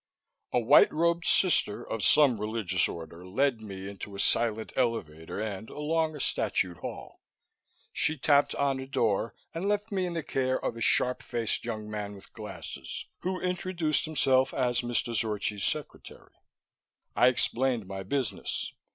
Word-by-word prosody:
A -, -, +2 dB
white 120 Hz, +5 st, +6 dB
robed 170 Hz, +2 st, +1 dB
sister 175 Hz, -, +3 dB
of 110 Hz, -3 st, -3 dB
some 130 Hz, -8 st, +5 dB
religious 105 Hz, -4 st, +1 dB
order 85 Hz, +1 st, -8 dB
led 120 Hz, +6 st, 0 dB
me 95 Hz, -3 st, -7 dB
into 100 Hz, 0 st, -8 dB
a -, -, -7 dB
silent 110 Hz, 0 st, +1 dB
elevator 90 Hz, -11 st, -2 dB
and 110 Hz, 0 st, -4 dB
along 155 Hz, +1 st, -1 dB
a -, -, -7 dB
statued 90 Hz, -8 st, 0 dB
hall. -, -, -8 dB, 0.7 s
She 155 Hz, -, +1 dB
tapped 145 Hz, +1 st, +3 dB
on 140 Hz, -1 st, +1 dB
a 130 Hz, -, -6 dB
door, 115 Hz, -4 st, 0 dB, 0.2 s
and 170 Hz, +4 st, -2 dB
left 205 Hz, +2 st, -1 dB
me 190 Hz, -2 st, 0 dB
in 175 Hz, -, -4 dB
the 165 Hz, -, -2 dB
care 130 Hz, -1 st, 0 dB
of -, -, -1 dB
a 115 Hz, -, -8 dB
sharp 125 Hz, +2 st, +3 dB
faced 115 Hz, -3 st, -2 dB
young 110 Hz, -3 st, -4 dB
man 105 Hz, -1 st, -5 dB
with 95 Hz, -, -14 dB
glasses -, -, -7 dB
who 185 Hz, +1 st, -2 dB
introduced 180 Hz, -4 st, 0 dB
himself 130 Hz, -4 st, +2 dB
as 125 Hz, -2 st, +1 dB
Mr. 120 Hz, -1 st, -1 dB
Zorchi's 105 Hz, -2 st, 0 dB
secretary. -, -, -5 dB, 0.8 s
I -, -, +6 dB
explained 125 Hz, -2 st, +1 dB
my 95 Hz, 0 st, -6 dB
business. 125 Hz, +3 st, -3 dB
120 Hz, 155 wpm, -29 LUFS, 105-150 Hz, 0.8 s, white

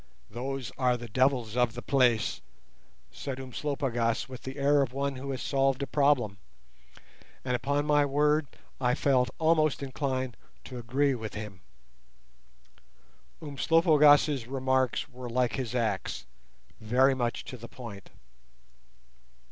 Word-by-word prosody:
"Those 130 Hz, +1 st, -4 dB
are 125 Hz, -2 st, +2 dB
the 120 Hz, 0 st, -8 dB
devils 125 Hz, -1 st, +1 dB
of 125 Hz, -2 st, +1 dB
the 120 Hz, -, -6 dB
place," 120 Hz, -, +2 dB, 0.7 s
said 135 Hz, -2 st, -6 dB
Umslopogaas 130 Hz, -3 st, -2 dB
with 130 Hz, -2 st, -9 dB
the 130 Hz, +2 st, -7 dB
air 140 Hz, +1 st, +3 dB
of 130 Hz, -3 st, -1 dB
one 140 Hz, 0 st, -2 dB
who 135 Hz, +2 st, -6 dB
has 130 Hz, -2 st, -3 dB
solved 135 Hz, -1 st, +1 dB
a -, -, -1 dB
problem, 130 Hz, -8 st, +1 dB, 1.1 s
and 125 Hz, -1 st, 0 dB
upon 140 Hz, +3 st, 0 dB
my 145 Hz, -1 st, +4 dB
word 150 Hz, +1 st, +2 dB, 0.3 s
I 125 Hz, -1 st, +2 dB
felt 130 Hz, -3 st, +2 dB
almost 155 Hz, -3 st, +2 dB
inclined 130 Hz, -2 st, -3 dB, 0.3 s
to 125 Hz, -2 st, -8 dB
agree 135 Hz, +4 st, +1 dB
with 110 Hz, -4 st, -6 dB
him. 105 Hz, -4 st, -7 dB, 1.8 s
Umslopogaas' 150 Hz, -3 st, +4 dB
remarks 130 Hz, -1 st, 0 dB
were 125 Hz, -3 st, -8 dB
like 120 Hz, -1 st, 0 dB
his 125 Hz, -2 st, -3 dB
axe—very 110 Hz, -, -1 dB
much 120 Hz, -2 st, -2 dB
to 130 Hz, -, -7 dB
the 115 Hz, 0 st, -10 dB
point. 115 Hz, -6 st, -10 dB
130 Hz, 125 wpm, -29 LUFS, 120-140 Hz, 1.8 s, my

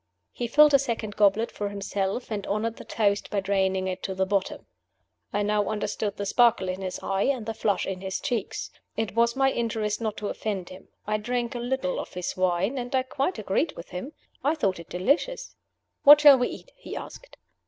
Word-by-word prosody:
He 240 Hz, -, -3 dB
filled 300 Hz, +4 st, +6 dB
a 275 Hz, -, +7 dB
second 230 Hz, -5 st, -3 dB
goblet 210 Hz, +2 st, +3 dB
for 205 Hz, -1 st, -3 dB
himself, 200 Hz, +3 st, -3 dB
and 205 Hz, -2 st, -3 dB
honored 220 Hz, +3 st, -1 dB
the -, -, -9 dB
toast 200 Hz, -2 st, 0 dB
by 205 Hz, -, 0 dB
draining 190 Hz, -1 st, 0 dB
it 185 Hz, -1 st, -3 dB
to 190 Hz, -, -4 dB
the 190 Hz, 0 st, +1 dB
bottom. 195 Hz, 0 st, -1 dB, 0.7 s
I 205 Hz, 0 st, 0 dB
now 210 Hz, 0 st, +1 dB
understood 210 Hz, -1 st, -2 dB
the 200 Hz, -, -3 dB
sparkle 230 Hz, -3 st, +3 dB
in 185 Hz, +1 st, -4 dB
his 185 Hz, -1 st, -4 dB
eyes 195 Hz, +5 st, +1 dB
and 255 Hz, -6 st, -1 dB
the 225 Hz, -, -3 dB
flush 205 Hz, -2 st, 0 dB
in 185 Hz, -1 st, -4 dB
his 190 Hz, -1 st, -3 dB
cheeks. 230 Hz, -5 st, -3 dB, 0.3 s
It 220 Hz, -4 st, -1 dB
was 235 Hz, +1 st, +2 dB
my 270 Hz, 0 st, +3 dB
interest 220 Hz, -3 st, -1 dB
not 215 Hz, -2 st, -2 dB
to 210 Hz, -, -3 dB
offend 195 Hz, -5 st, -3 dB
him. 185 Hz, +1 st, -12 dB, 0.2 s
I 215 Hz, +1 st, 0 dB
drank 240 Hz, +2 st, -2 dB
a 240 Hz, -, -4 dB
little 240 Hz, -6 st, -1 dB
of -, -, -7 dB
his 180 Hz, -1 st, -3 dB
wine, 185 Hz, +7 st, +1 dB
and 245 Hz, +2 st, -3 dB
I 260 Hz, -, +3 dB
quite 275 Hz, +7 st, -2 dB
agreed 215 Hz, -, 0 dB
with 170 Hz, -, -9 dB
him. 185 Hz, -, -6 dB, 0.3 s
I 295 Hz, +4 st, +2 dB
thought 195 Hz, -, 0 dB
it 170 Hz, -, -11 dB
delicious. 290 Hz, -, 0 dB, 0.5 s
"What 295 Hz, +1 st, +9 dB
shall 285 Hz, -3 st, +9 dB
we 245 Hz, -, +2 dB
eat?" -, -, -10 dB
he -, -, -8 dB
asked. -, -, -9 dB
210 Hz, 210 wpm, -26 LUFS, 195-245 Hz, 0.7 s, What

